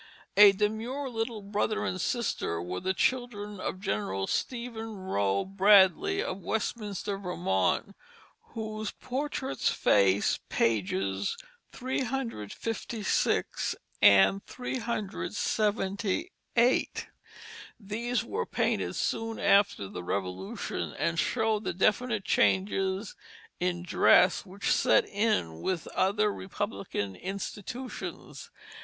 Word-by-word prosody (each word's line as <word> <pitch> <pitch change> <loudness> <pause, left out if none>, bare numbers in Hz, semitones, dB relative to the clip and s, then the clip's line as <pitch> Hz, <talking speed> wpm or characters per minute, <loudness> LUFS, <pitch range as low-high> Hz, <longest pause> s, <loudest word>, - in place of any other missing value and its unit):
A 205 -1 +10
demure 225 +7 -2
little 225 -2 -3
brother 210 +2 -1
and 185 0 -2
sister 220 - -1
were 90 +2 -4
the 190 0 -1
children 235 -6 -1
of 185 - -3
General 195 - -2
Stephen 230 - -3
Rowe 100 - 0
Bradley 200 - +5
of 185 - -4
Westminster, 205 -2 -3
Vermont, 170 - 0 0.6
whose 215 -1 -4
portraits 270 +1 -2
face 100 0 +3
pages 95 -3 0 0.3
356 230 - -2 0.3
and 100 - +6
378. 225 - -1 0.7
These 230 +3 -2
were 440 - -3
painted - - 0
soon 225 0 -2
after 200 - +3
the 90 - -7
Revolution, 95 0 -4
and 165 -1 0
show 220 0 +1
the 220 - -3
definite 215 +2 +1
changes 190 +1 +1 0.4
in 175 -1 -1
dress 180 +2 +4
which 195 +2 -2
set - - +4
in 200 - 0
with 185 -3 -1
other 205 +2 +1
Republican 190 - -4
institutions. 205 - -6
205 Hz, 95 wpm, -29 LUFS, 180-230 Hz, 0.7 s, A